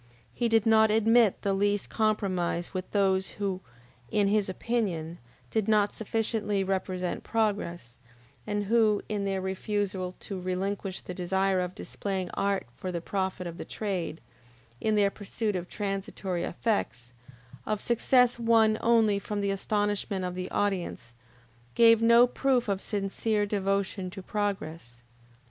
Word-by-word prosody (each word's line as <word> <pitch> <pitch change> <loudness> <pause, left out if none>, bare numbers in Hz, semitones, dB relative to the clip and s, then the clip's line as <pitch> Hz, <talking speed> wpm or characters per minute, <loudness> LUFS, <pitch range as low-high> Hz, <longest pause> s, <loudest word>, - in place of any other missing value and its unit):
He 240 -1 0
did 225 -1 +3
not 220 -1 +5
admit 225 0 +4
the 200 - +1
least 205 +1 0
compromise 185 -5 0
with 185 -1 -4
those 190 -2 +1
who, 195 -2 -2 0.5
in 205 -2 +2
his 205 -1 +2
opinion, 185 -6 -2 0.3
did 220 -2 0
not 210 -1 +3
sufficiently 215 -2 -1
represent 185 -1 -2
progress, 200 - -2 0.5
and 205 0 -1
who, 215 -1 +3
in 205 -2 -2
their 195 -1 -1
refusal 190 -1 -2
to 195 -3 -5
relinquish 190 +1 -3
the 180 - -7
desire 190 +1 +1
of 180 0 -3
displaying 190 -3 -4
art 200 -1 0
for 185 - -5
the 170 - -2
profit 190 +1 -2
of 170 0 -7
the - - -3
trade, 185 -6 -4 0.6
in 215 -1 +1
their 200 -1 +3
pursuit 210 +1 -3
of 180 -1 -4
transitory 195 -3 -3
effects, 125 - -2 0.5
of 215 -1 0
success 245 +1 +3
won 225 -2 +4
only 225 -3 +4
from 205 +1 -4
the 200 -1 0
astonishment 205 -1 -1
of 180 - -3
the 185 0 -4
audience, 180 -12 -2 0.6
gave 230 -1 +6
no 235 +1 +7
proof 250 -1 +1
of 200 -1 -1
sincere 205 +1 -1
devotion 195 -2 -1
to 195 +1 -9
progress. 165 - -4
200 Hz, 140 wpm, -28 LUFS, 185-215 Hz, 0.6 s, no